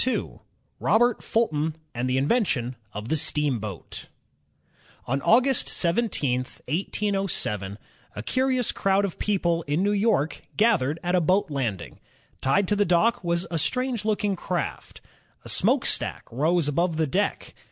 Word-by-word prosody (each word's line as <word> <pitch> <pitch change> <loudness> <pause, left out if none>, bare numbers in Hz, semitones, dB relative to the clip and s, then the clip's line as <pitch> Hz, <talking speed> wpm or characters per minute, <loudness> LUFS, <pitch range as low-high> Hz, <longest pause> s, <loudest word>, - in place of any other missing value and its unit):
n 260 - -2 0.4
ROBERT 240 +1 +3
FULTON 160 -9 0 0.2
AND 125 +1 -2
THE 130 - +1
INVENTION 135 - +1 0.2
OF 105 +3 -6
THE - - +2
STEAMBOAT 125 - -2 1.0
On 135 +3 -1
August 255 - +3
17, 170 - 0
1807, 155 - -2 0.4
a 105 - -5
curious 255 - +1
crowd 195 +1 +1
of 190 - -6
people 175 -5 +1
in 150 +6 +1
New 205 - +2
York 205 -7 +1 0.2
gathered 195 - +3
at 175 +1 -1
a 180 - +4
boat 185 +1 +2
landing. 110 - -3 0.4
Tied 140 +9 +2
to 205 - +2
the 205 - +3
dock 205 +6 +2
was 170 0 0
a 165 - 0
strange 250 - -1
looking 210 -2 0
craft. 175 -3 -4 0.4
A - - -6
smokestack - - +2
rose 155 +6 +2
above 165 +3 0
the 160 - +2
deck. 195 +8 -1
170 Hz, 140 wpm, -25 LUFS, 140-210 Hz, 1.0 s, a